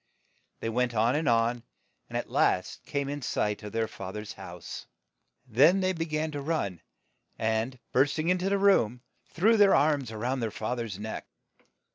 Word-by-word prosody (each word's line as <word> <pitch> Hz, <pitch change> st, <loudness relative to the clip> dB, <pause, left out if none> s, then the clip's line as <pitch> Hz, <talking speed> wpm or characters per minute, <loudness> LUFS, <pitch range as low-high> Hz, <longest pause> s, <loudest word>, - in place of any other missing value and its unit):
They 115 Hz, -, -2 dB
went 120 Hz, +1 st, 0 dB
on 115 Hz, +3 st, +3 dB
and 155 Hz, 0 st, +1 dB
on, 115 Hz, +1 st, +2 dB, 0.5 s
and -, -, -2 dB
at -, -, -3 dB
last -, -, +1 dB
came 140 Hz, -1 st, -1 dB
in 145 Hz, +1 st, -4 dB
sight 105 Hz, -4 st, -1 dB
of 105 Hz, -1 st, -7 dB
their 115 Hz, 0 st, 0 dB
fa 95 Hz, -3 st, -7 dB
ther's 105 Hz, +1 st, -6 dB
house. 90 Hz, -3 st, -9 dB, 0.6 s
Then 140 Hz, -, +5 dB
they 185 Hz, 0 st, +1 dB
be 165 Hz, -2 st, -2 dB
gan 155 Hz, 0 st, -1 dB
to 145 Hz, -1 st, -4 dB
run, 120 Hz, -, -2 dB, 0.6 s
and 110 Hz, +3 st, -1 dB
burst 140 Hz, +4 st, +3 dB
ing 160 Hz, +2 st, 0 dB
in 180 Hz, 0 st, +3 dB
to 190 Hz, +2 st, 0 dB
the 200 Hz, -, +2 dB
room, 125 Hz, -, +3 dB, 0.3 s
threw 220 Hz, +7 st, +3 dB
their 205 Hz, -2 st, +6 dB
arms 140 Hz, -4 st, +2 dB
round 120 Hz, +4 st, -2 dB
their 115 Hz, -, 0 dB
fa 110 Hz, +3 st, -3 dB
ther's 115 Hz, -6 st, -4 dB
neck. 110 Hz, +2 st, -6 dB
125 Hz, 185 wpm, -28 LUFS, 110-155 Hz, 0.6 s, their